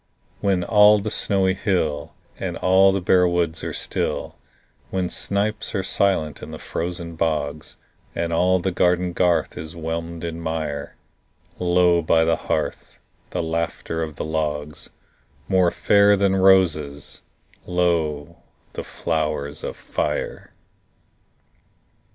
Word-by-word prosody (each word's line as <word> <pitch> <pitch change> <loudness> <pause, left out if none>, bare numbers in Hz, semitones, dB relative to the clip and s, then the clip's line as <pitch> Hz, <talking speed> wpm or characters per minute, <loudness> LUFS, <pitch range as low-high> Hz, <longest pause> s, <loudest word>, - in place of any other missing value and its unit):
When 95 -3 +1
all 105 +2 +6
the 105 +1 -3
snowy 95 -2 +2
hill 90 -7 -1 0.2
And - - -3
the 95 0 +4
bare 90 0 +5
woods 85 -2 0
are - - -3
still; - - -2 0.5
When 95 -2 -1
snipes 105 +2 -2
are 95 - 0
silent 95 -6 +1
in - - -8
the - - -7
frozen 85 -1 -5
bogs, 75 -2 -2 0.4
And 85 0 -2
all 90 +2 +3
the 95 +2 -1
garden 90 0 +1
garth 90 -1 +1
is 80 +2 -7
whelmed 85 +1 -5
in 85 0 -4
mire, 80 -3 -4 0.6
Lo, 90 -1 +3
by 80 0 +3
the 80 - +3
hearth, - - -3 0.3
the - - -2
laughter 80 0 -3
of 80 -2 -4
the - - -4
logs— 75 -1 -3 0.6
More 95 -2 +3
fair 100 +3 +4
than 100 -1 +2
roses, 85 -7 +2 0.5
lo, 85 -3 0 0.4
the - - -5
flowers 75 -3 -3
of - - -5
fire! - - -3
85 Hz, 125 wpm, -22 LUFS, 80-95 Hz, 0.6 s, all